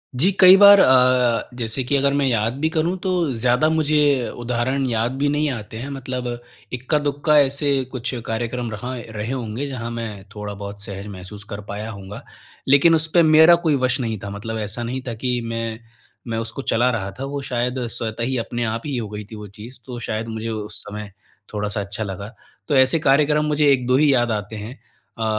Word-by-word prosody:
जी, 175 +10 +4
कई 185 0 +10
बार 200 0 +9
अ, 125 -4 +4
जैसे 115 +2 -2
कि 140 +3 0
अगर 140 0 +2
मैं 140 -1 +1
याद 115 -2 +1
भी 160 +1 +1
करूँ 170 +3 0
तो 180 -6 0
ज़्यादा 125 +6 +2
मुझे 150 -5 +2
उदाहरण 125 +3 -1
याद 115 +2 0
भी 145 +1 +1
नहीं 150 0 +1
आते 110 -2 -7
हैं। 135 +5 -6
मतलब 130 -2 -4 0.5
इक्का-दुक्का 145 +3 +1
ऐसे 140 +1 +2 0.2
कुछ 130 0 -4
कार्यक्रम 120 +1 -3
रहा 125 +5 -5
एँ 115 - -7
रहे 110 +3 -4
होंगे, 125 +2 -3
जहाँ 120 -3 -5
मैं 110 -4 -6
थोड़ा 105 0 -5
बहुत 100 0 -8
सहज 100 +1 -6
महसूस 100 +1 -9
कर 105 0 -6
पाया 105 +2 -5
होऊँगा। 100 +5 -9 0.4
लेकिन 140 +5 +6
उस 160 0 0
पे 170 -1 +6
मेरा 160 +2 +7
कोई 150 - +4
वश 130 +1 +1
नहीं 115 -3 -2
था 100 - -5
मतलब 110 +3 -5
ऐसा 110 +2 -3
नहीं 130 +2 -3
था 120 - -2
कि 125 +2 -2
मैं, 115 -1 -4 0.5
मैं 115 -1 -2
उसको 115 +4 -4
चला 120 0 +2
रहा 100 -4 -3
था - - -3
वो 140 - -2
शायद 125 +2 -1
स्वतः 115 0 -4
ही 130 +1 -1
अपने 120 +1 -3
आप 115 +1 -2
ही 140 -4 -2
हो 110 -4 -4
गई 105 0 -7
थी - - -7
वो 105 -1 -8
चीज़। 115 +6 -12
तो 125 -2 -7
शायद 115 0 -3
मुझे 110 0 -4
उस 105 -1 -5
समय 105 -1 -7 0.4
थोड़ा-सा 105 0 -2
अच्छा 100 +2 -4
लगा। 100 +3 -6 0.3
तो 145 - +1
ऐसे 130 +4 +5
कार्यक्रम 150 +2 +3
मुझे 150 -1 +2
1-2 125 -1 +2
ही 145 -2 +4
याद 120 -2 +2
आते 105 0 -3
हैं। 110 +6 -7 0.4
अ, - - -1
120 Hz, 205 wpm, -21 LUFS, 110-140 Hz, 0.5 s, कई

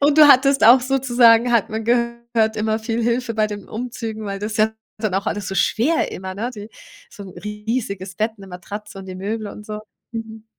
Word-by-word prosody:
Und 285 +1 +3
du 305 - +10
hattest 275 -1 +5
auch 240 +4 +8
sozusagen, 245 -2 +4
hat 230 -4 +3
man 220 +1 -4
gehört, 235 -1 0
immer 215 0 0
viel 225 +1 -2
Hilfe 235 0 0
bei 215 -1 +2
den 205 -1 -8
Umzügen, 225 -2 -5
weil 200 -1 -4
das 210 +2 -4
ist - - -5
ja 215 +1 +3 0.3
dann 215 -3 -1
auch 195 +1 -1
alles 205 -2 -2
so 195 - -4
schwer 245 - +1
immer, 190 0 -6
ne? 225 +5 -3
Die 210 +1 -9 0.4
so 205 - -10
'n - - -10
riesiges 210 -3 -4
Bett, 220 +3 -2
'ne 195 - -11
Matratze 195 +3 -8
und 190 - -9
die 185 - -7
Möbel 210 +4 -4
und 210 +1 -10
so. 210 0 -5 0.3
Mhm. 225 -1 -7
220 Hz, 215 wpm, -21 LUFS, 210-235 Hz, 0.4 s, du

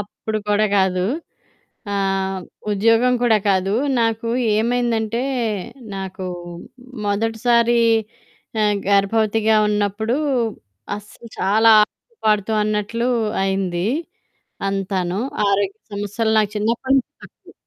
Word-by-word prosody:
అప్పుడు 215 +1 -4
కూడా 210 +1 +3
కాదు. 185 -1 +1 0.9
ఆహ్, 195 -1 -1 0.3
ఉద్యోగం 230 +4 +3
కూడా 225 -3 +5
కాదు. 195 +1 +1 0.3
నాకు 225 0 0 0.3
ఏమైందంటే 235 0 0 0.7
నాకు 190 -1 -5 0.8
మొదటిసారి 230 +3 +2 0.8
ఆహ్, 210 -1 +2
గర్భవతిగా 215 +2 +2
ఉన్నప్పుడు, 210 +3 0 0.8
అస్సలు 215 +3 -13
చాలా 220 +4 +4 0.2
ఆడుతూ 480 - -40
పాడుతూ 210 0 +2
అన్నట్లు 215 +3 -1 0.3
అయింది 190 -2 -1 0.8
అంతాను. 190 -1 -2 0.3
ఆరోగ్య 200 0 0 0.2
సమస్యలు 205 +2 -1
నాకు 210 -1 0
చిన్నప్పుడు 230 +5 0
నుంచి 255 - -2
తక్కువ. - - -16
210 Hz, 90 wpm, -20 LUFS, 195-225 Hz, 0.9 s, కూడా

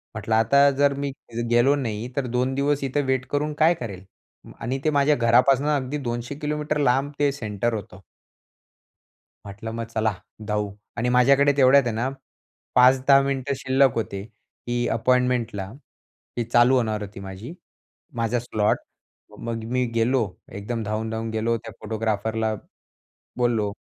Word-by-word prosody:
म्हटलं 110 - -1
आता 140 +6 +5
जर 145 0 +4
मी 140 -1 -2 0.4
गेलो 120 +4 +4
नाही 120 -3 -3
तर 140 - -1
2 125 +2 0
दिवस 140 +1 0
इथे 135 +2 0
वेट 130 -1 -1
करून 150 +1 -1
काय 160 +2 +5
करेल 100 - -7 0.6
आणि 130 +3 -3
ते - - +4
माझ्या 145 0 +3
घरापासनं 125 +4 +3
अगदी 135 +1 -2
200 120 +4 -4
किलोमीटर 150 0 -2
लांब 135 +1 +2
ते 145 -1 +3
सेंटर 115 -3 -2
होतं. 100 -3 -7 1.4
म्हटलं 105 +3 -7
मग 115 0 -3
चला 110 -1 +1 0.3
धावू 105 -1 -1 0.3
आणि 120 +1 0
माझ्याकडे 140 +3 +5
तेवढ्यात 135 +1 +6
आहे 120 - -1
ना 125 +4 -1 0.7
5-10 130 +2 +6
मिनिटं 140 0 -1
शिल्लक 135 0 +3
होते. 100 -3 -3 0.5
ही 120 0 0
अपॉइंटमेंटला, 125 -3 +1 0.7
ही 120 - +1
चालू 120 +2 +4
होणार 110 -4 0
होती 100 -1 -8
माझी, 95 - -8 0.6
माझा 115 +1 0
स्लॉट. 110 -3 0 0.6
मग 115 -1 -4
मी 125 0 +1
गेलो. 120 +2 +2 0.3
एकदम 110 +3 -4
धावून 110 +1 -3
धावून 110 0 -3
गेलो. 115 +1 0
त्या 115 0 -10
फोटोग्राफरला 110 0 -1 0.8
बोललो. 115 -4 +1
120 Hz, 145 wpm, -24 LUFS, 110-135 Hz, 1.4 s, तेवढ्यात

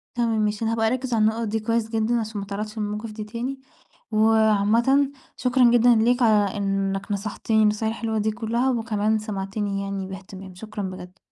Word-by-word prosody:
تمام 230 -2 +1
ماشي، 210 +1 -1
أنا 225 - +1
هابقى 225 -1 +1
أركّز 255 +1 -1
على 225 - +2
النُقَط 220 +1 +1
دي 220 +1 -1
كويس 230 +1 -1
جِدًّا، 225 +1 +1
عشان 220 -1 -4
ما - - -6
اتعرَّضش 210 +2 -5
للمواقِف 210 +1 -3
دي 215 0 -6
تاني. 240 +5 -5 0.5
وعامَّةً 220 +5 +3 0.3
شكرًا 250 -1 +4
جِدًا 240 0 +5
ليك 240 +3 +2
على 210 -4 +3
إنِّك 195 0 -1
نصحتنِي 215 +2 0
النصايح 215 +1 +1
الحِلوة 225 -1 -2
دي 215 +1 0
كُلّها، 235 +4 0
وكَمان 220 -2 0
سمعتنِي 200 -1 -3
يَعني 195 -1 -4
باهتِمام، 190 -1 -10
شكرًا 210 +1 -6
بجد. 185 0 -7
220 Hz, 175 wpm, -24 LUFS, 205-230 Hz, 0.5 s, جِدًا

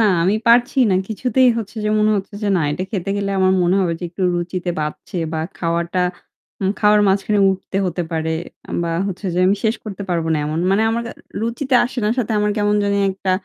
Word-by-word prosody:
না, - - +5 0.2
আমি 190 +4 +2
পারছি 240 +2 +4
না। - - +3
কিছুতেই 250 +4 +2
হচ্ছে 225 0 -7
যে - - +1
মনে 215 0 +3
হচ্ছে 200 +1 -5
যে 210 - 0
না - - +1
এটা 150 +5 -2
খেতে 195 -2 -3
খেলে 200 -1 -2
আমার 185 0 +4
মনে 175 +2 +3
হবে 175 -3 +1
যে - - -4
একটু 180 +3 -6
রুচিতে 175 +1 -2
বাঁধছে 150 +5 -5 0.2
বা 160 - -1 0.2
খাওয়াটা 170 +1 -1 0.6
হু, - - -2
খাওয়ার 210 0 +5
মাঝখানে 200 +2 +1
উঠতে 190 0 -4
হতে 175 0 -2
পারে 160 0 -1 0.5
বা 170 - -2 0.2
হচ্ছে 195 +1 -5
যে - - 0
আমি 195 +2 +3
শেষ 220 0 +2
করতে 205 -2 -6
পারবো 165 -2 0
না - - +2
এমন। 155 +2 -2
মানে 200 +3 +3
আমার 230 +1 -1 0.4
রুচিতে 255 +4 -1
আসে 245 +1 -5
না। - - +2
সাথে 230 -2 0
আমার 210 0 +1
কেমন 205 0 +2
জানি 200 0 +1 0.2
একটা 190 0 -3
195 Hz, 215 wpm, -19 LUFS, 175-215 Hz, 0.6 s, না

